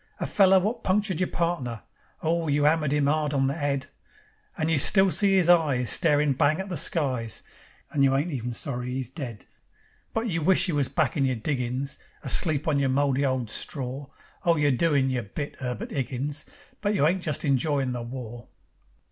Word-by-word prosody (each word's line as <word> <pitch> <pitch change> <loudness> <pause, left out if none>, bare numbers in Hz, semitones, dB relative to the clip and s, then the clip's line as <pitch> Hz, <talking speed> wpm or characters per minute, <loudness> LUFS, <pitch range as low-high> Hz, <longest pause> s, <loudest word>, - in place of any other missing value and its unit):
A - - -2
feller 190 -1 +5
wot 215 +6 -2
punctured 190 -2 0
your 185 - 0
partner; 160 - -2 0.4
Oh, 165 +1 0
you 145 0 +1
'ammered 150 -1 +2
'im 145 -1 +2
'ard 150 0 0
on 135 -1 +2
the 135 - 0
'ead, 140 -3 -2 0.7
And 160 -1 0
you 155 - +3
still 190 +6 +4
see 195 0 +3
'is 185 -3 +3
eyes 150 -8 +3
Starin' 150 -3 +2
bang 145 +4 +2
at 190 +1 -5
the 180 - -3
skies, 130 -8 -1 0.5
And 140 - +1
you 135 -1 +3
ain't 150 +6 0
even 125 -3 -4
sorry 125 0 -3
'e's 130 -2 -4
dead. 125 - -7 0.7
But 225 +1 -2
you 165 -5 -1
wish 190 +5 +4
you 175 - -1
was 145 -3 +2
back 155 -6 0
in 140 - +2
your 130 -1 0
diggin's 130 +2 -3 0.2
Asleep 155 -3 +2
on 145 -3 +2
your 135 -1 +1
mouldy 140 0 +1
old 130 -4 -1
stror. 135 +3 -2 0.3
Oh, 170 -1 +3
you're 145 -2 +2
doin' 140 0 +2
yer 125 -1 -1
bit, 140 +7 -6
'Erbert 125 -2 -4
'Iggins, 140 +2 -3 0.4
But 205 0 0
you 150 - +2
ain't 180 +4 +1
just 155 -2 -2
enjoyin' 140 -1 +1
the 125 -1 -4
war." 120 -1 -8
145 Hz, 190 wpm, -26 LUFS, 130-165 Hz, 0.7 s, feller